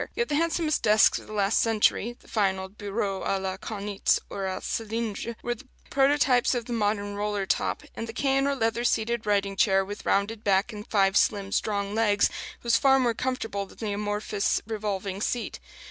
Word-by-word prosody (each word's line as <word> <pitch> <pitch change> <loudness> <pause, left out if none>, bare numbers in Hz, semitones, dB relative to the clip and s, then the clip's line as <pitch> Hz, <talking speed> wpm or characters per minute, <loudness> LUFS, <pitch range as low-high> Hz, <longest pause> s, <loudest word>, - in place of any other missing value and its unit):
yet 470 - -1
the 290 - 0
handsomest 325 0 +1
desks 215 0 +5
of - - -14
the 215 - -9
last 200 0 +2
century 225 +1 +1
the - - -21
fine 195 -4 +1
old 190 +1 -8
bureaux 200 -2 -3
à 195 - 0
la 190 -1 -3
Kaunitz 200 0 -1
or 195 -1 -3
à 190 0 -2
cylindre 225 0 -3
were 240 - 0
the 240 - -14 0.2
prototypes 270 -3 +3
of 240 -2 -2
the 240 - -4
modern 205 -2 0
"roller 205 -1 -2
top"; - - -1
and 225 - -5
the - - -5
cane 270 +2 +1
or 280 - +1
leather 230 -1 0
seated 230 -1 0
writing 200 -1 +1
chair, 195 0 +3
with 205 +2 -7
rounded 210 +2 0
back 200 +3 +2
and 210 +2 -8
five 195 -2 +2
slim 200 -1 +2
strong 200 -1 -1
legs, 210 -2 +3 0.3
was 235 -1 +4
far 270 -1 +5
more 245 -3 +2
comfortable 225 -5 -3
than - - -17
the 215 -3 -3
amorphous 205 0 -1
revolving 205 -3 -3
seat. 240 +2 -2
210 Hz, 190 wpm, -27 LUFS, 200-235 Hz, 0.3 s, desks